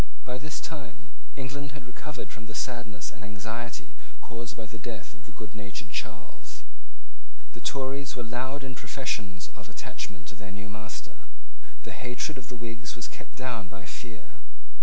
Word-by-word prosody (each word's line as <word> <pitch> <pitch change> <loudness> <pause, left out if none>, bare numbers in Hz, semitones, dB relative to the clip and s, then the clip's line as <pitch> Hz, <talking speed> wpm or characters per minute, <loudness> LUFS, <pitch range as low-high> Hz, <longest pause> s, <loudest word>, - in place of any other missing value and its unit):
By 125 0 +2
this 155 0 +2
time 130 - -2 0.3
England 140 +1 +1
had 130 - -5
recovered 135 +3 -2
from 110 -1 -4
the 110 - -2
sadness 120 -9 +2
and 110 - -8
anxiety 110 +4 0 0.3
caused 115 -1 -1
by 115 - 0
the 110 +1 -4
death 110 -4 -1
of 95 -2 -13
the 110 - -7
goodnatured 100 -2 -2
Charles. 110 -2 0 0.9
The 120 - -5
Tories 135 +1 +4
were 120 - +4
loud 130 +4 +3
in 130 - +1
professions 105 -9 +2
of 105 -1 -6
attachment 100 -3 -1
to - - -4
their 100 -1 -4
new 100 +1 -2
master. 110 +1 -3 0.6
The - - 0
hatred 125 +3 +3
of 120 - -8
the 125 - 0
Whigs 115 +1 0
was 115 - +2
kept - - -7
down 120 -7 +3
by 100 +1 -4
fear. 115 -1 -4
115 Hz, 165 wpm, -35 LUFS, 105-130 Hz, 0.9 s, Tories